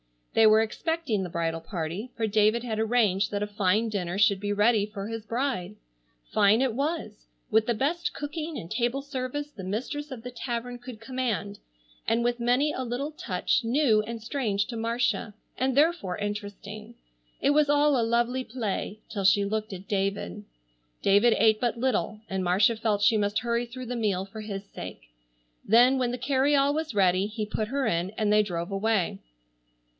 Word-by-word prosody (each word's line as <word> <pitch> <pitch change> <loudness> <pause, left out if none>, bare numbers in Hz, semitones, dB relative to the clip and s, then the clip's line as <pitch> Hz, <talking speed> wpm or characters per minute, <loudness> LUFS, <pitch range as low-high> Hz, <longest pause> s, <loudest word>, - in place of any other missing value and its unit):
They 225 -1 +6
were 215 +1 +6
expecting 240 - -1
the 185 - -4
bridal 165 -1 -2
party, 170 +6 -5
for 225 - -1
David 215 +2 +2
had 220 -3 -3
arranged 215 -4 +2
that 205 0 -2
a - - -2
fine 205 +2 +1
dinner 185 -3 -2
should 200 -1 +4
be 205 +1 -1
ready 210 0 +3
for 205 -1 -6
his 225 -1 -5
bride. 230 -5 -2 0.6
Fine 210 +3 +4
it 265 -4 +1
was, 275 -5 -3 0.2
with 220 0 +3
the 240 - +2
best 335 +8 -1
cooking 305 +1 -5
and 170 -7 -8
table 245 +3 0
service 285 +2 -4
the 195 - -9
mistress 265 +9 -3
of 250 -5 -8
the 250 - -6
tavern 245 0 -4
could 245 -3 -10
command, 225 -5 -3 0.5
and 230 +1 +2
with 240 0 0
many 250 +5 +2
a 260 - -3
little 255 +5 -3
touch 220 -4 -1
new 235 -2 +3
and 225 0 -6
strange 225 -6 -1
to 240 -2 -5
Marcia, 230 -1 -1 0.2
and 260 0 0
therefore 295 - +2
interesting. 205 +2 -6 0.5
It 280 - +3
was 295 0 +3
all 290 -2 +4
a - - +3
lovely 240 +3 +1
play 215 -3 -4
till 200 -3 -3
she 200 +1 +5
looked 215 0 -2
at 190 +1 -9
David. 195 - -2 0.6
David 205 +4 +5
ate 220 -1 +4
but 240 -1 0
little, 235 -3 -1
and 190 -1 -2
Marcia 195 +6 +3
felt 215 -2 0
she 220 +1 +5
must 205 +1 +1
hurry 235 0 -1
through 255 +2 -8
the 245 - -3
meal 200 -4 0
for 215 +2 -9
his 200 -2 -5
sake. - - -9 0.5
Then 245 +4 +5
when 250 -2 +1
the 245 - -3
carryall 275 +2 +2
was 310 -6 -3
ready 190 0 +3
he 215 0 -4
put 215 0 -2
her 270 +3 -1
in 175 -2 0
and 215 -1 0
they 210 - +6
drove 175 -3 -3
away. 195 - 0
225 Hz, 185 wpm, -27 LUFS, 205-250 Hz, 0.6 s, They